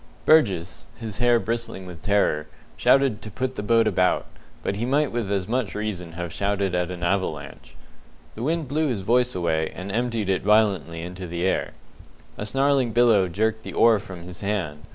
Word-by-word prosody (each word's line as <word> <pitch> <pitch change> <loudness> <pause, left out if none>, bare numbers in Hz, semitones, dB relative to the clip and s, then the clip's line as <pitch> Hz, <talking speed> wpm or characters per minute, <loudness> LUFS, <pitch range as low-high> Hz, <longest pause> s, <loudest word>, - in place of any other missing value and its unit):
Burgess 95 - +3
his 110 -2 -7
hair 120 -1 +4
bristling 115 -5 -4
with 90 -3 -10
terror 100 -7 +1 0.3
shouted 135 -6 +3
to 110 - -8
put 130 +5 -3
the 105 - -5
boat 115 +2 +3
about, 90 -4 +2 0.4
but 100 - -2
he 110 - -2
might 140 +3 +1
with 115 -4 -2
as 95 -2 -1
much 120 -2 -1
reason 95 -6 -4
have 85 -1 -5
shouted 100 -2 -1
at 90 0 0
an 90 -1 -6
avalanche. 85 -6 -3 0.6
The 110 - -8
wind 160 +3 -1
blew 155 +4 0
his 120 -7 -1
voice 125 +5 +2
away, 80 -3 0
and 95 +2 -6
emptied 115 -1 -1
it 95 -1 +1
violently 95 -6 +2
into 90 +1 -7
the 85 +1 -3
air. 95 - 0 0.6
A 105 - -5
snarling 135 -1 +2
billow 115 -6 +4
jerked 110 +5 -1
the - - -8
oar 115 -2 +5
from 90 -3 -10
his 90 0 -11
hand. 95 -8 -3
100 Hz, 185 wpm, -24 LUFS, 90-120 Hz, 0.6 s, oar